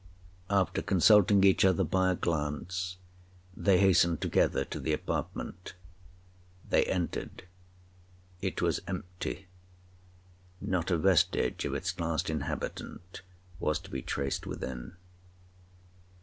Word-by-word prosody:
After 100 -2 +1
consulting 100 +1 +5
each 95 -1 +5
other 95 -3 +4
by 95 0 +2
a 90 - +2
glance, 85 +3 -2 0.6
they 100 -3 +3
hastened 90 -4 +4
together - - +1
to - - -6
the - - -1
apartment. 90 - -4 0.9
They - - +3
entered—it 90 0 -6
was - - +1
empty—not 90 +2 -5 1.4
a 85 - +2
vestige 90 +1 +2
of - - -2
its 90 0 -3
last 85 +1 -1
inhabitant 90 +3 -5 0.4
was 75 -1 +1
to - - -12
be 65 - -3
traced 70 +1 -3
within. 65 +5 -6
90 Hz, 105 wpm, -30 LUFS, 85-95 Hz, 1.4 s, consulting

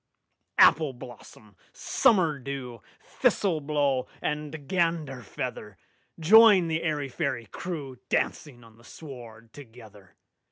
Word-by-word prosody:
Appleblossom, 120 -7 +1 0.2
Summerdew, 140 - 0 0.4
Thistleblow, 145 -7 +1
and 150 0 -3 0.2
Ganderfeather! 160 - -3 0.4
Join 200 +1 +7
the 160 0 -1
airy 150 -4 -2
fairy 130 -4 -3
crewDancing 130 - -4
on 110 -1 -19
the - - -19
sward 120 -6 -12
together! 110 -7 -15
140 Hz, 80 wpm, -27 LUFS, 120-160 Hz, 0.4 s, Join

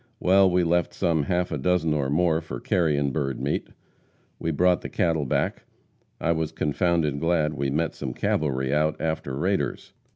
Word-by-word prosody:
Well, 95 +1 +5
we 90 0 +2
left 85 0 +1
some 85 -4 +1
half 90 +3 0
a - - -2
dozen 90 -3 +1
or 70 -3 0
more 80 +2 +2
for 80 - -7
carrion 75 -6 +1
bird 70 -2 -2
meat. - - -2 0.7
We 80 - -2
brought 90 +3 +2
the - - -6
cattle 80 -4 0
back. - - -1 0.6
I 85 - +1
was 80 -1 -1
confounded 80 -1 0
glad 80 -2 +1
we 70 -2 -2
met 80 +3 -1
some 65 -3 -5
cavalry 65 -2 0
out 75 +1 +1
after 80 -4 -2
raiders. 95 +6 -2
80 Hz, 170 wpm, -25 LUFS, 75-85 Hz, 0.7 s, Well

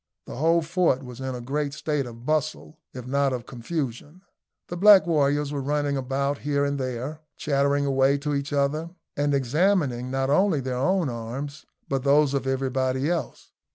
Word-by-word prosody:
The - - -8
whole 165 +3 +3
fort 165 -5 +1
was 125 -1 -10
in 130 -1 -3
a 125 - -6
great 140 +3 -2
state 150 -3 -2
of 115 0 -11
bustle, 155 +1 -2
if 125 -2 -8
not 140 +1 +1
of 120 -2 -4
confusion. 145 +5 -5 0.4
The 175 - -5
black 200 +2 +7
warriors 145 -3 +1
were 140 - -2
running 145 +1 0
about 140 +2 -1
here 140 0 0
and 140 0 -1
there, 130 +4 -4 0.2
chattering 140 -1 +1
away 135 0 +3
to 145 +1 -3
each 140 +1 -2
other, 145 +3 0 0.3
and 145 0 +1
examining 140 -2 +1
not 135 +1 0
only 185 0 +3
their 130 -1 -3
own 180 +5 +1
arms, 130 +5 -6 0.2
but 135 -2 -1
those 140 0 +4
of 135 -1 -1
everybody 130 +2 0
else. 165 -8 -4
140 Hz, 175 wpm, -25 LUFS, 130-150 Hz, 0.4 s, black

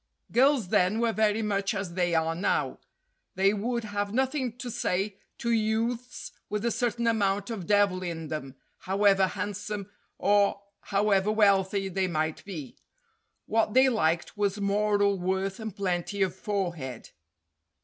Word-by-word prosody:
Girls 255 -5 +3
then 185 +5 +2
were 230 -1 +1
very 215 0 +2
much 200 -1 0
as 190 -3 -4
they 175 -1 +1
are 160 0 +1
now. 175 +4 -1 0.6
They 195 +2 +3
would 235 +3 -2
have 205 -1 -3
nothing 260 0 -1
to 250 -1 -5
say 200 -3 -1 0.2
to 235 - -1
youths 230 +2 -1 0.2
with 210 +2 -2
a 235 - +2
certain 235 0 -1
amount 205 -2 +1
of 195 -7 -5
devil 205 -3 +3
in 165 -3 -4
them, 135 -4 -5 0.2
however 195 0 +3
handsome 205 +1 -5 0.3
or 200 0 +2 0.2
however 200 0 +2
wealthy 200 -2 +3
they 190 0 0
might 155 -2 -2
be. 160 -10 -7 0.7
What 220 0 +1
they 260 +1 +6
liked 170 -8 0
was 205 -1 0
moral 205 0 +2
worth 190 +2 -1
and 220 -3 -6
plenty 195 +1 -1
of 185 -2 -1
forehead. 175 - -4
200 Hz, 145 wpm, -28 LUFS, 185-220 Hz, 0.7 s, they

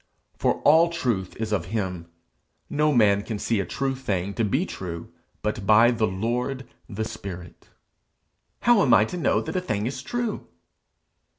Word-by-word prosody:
For - - 0
all 160 +3 +6
truth 120 - -2
is 110 -1 -4
of 95 -5 0
him; 90 -4 -3 0.6
no 150 +1 +2
man 105 -6 +4
can 110 +1 -5
see 110 +1 0
a 100 - -2
true 135 -1 -1
thing 100 -7 -2
to 115 - -1
be 130 - +1
true 85 - -7 0.3
but 105 -2 -2
by 115 +3 +6
the 115 -2 +1
Lord, 120 +7 -2 0.2
the 110 0 -3
spirit. 95 -6 -9 0.9
'How 240 -4 +5
am 125 -4 +5
I 105 - +5
to 145 - -6
know 170 - +2
that - - -6
a 185 - +1
thing 105 - -2
is 130 +1 -3
true?' 240 - -3
110 Hz, 170 wpm, -25 LUFS, 100-135 Hz, 0.9 s, all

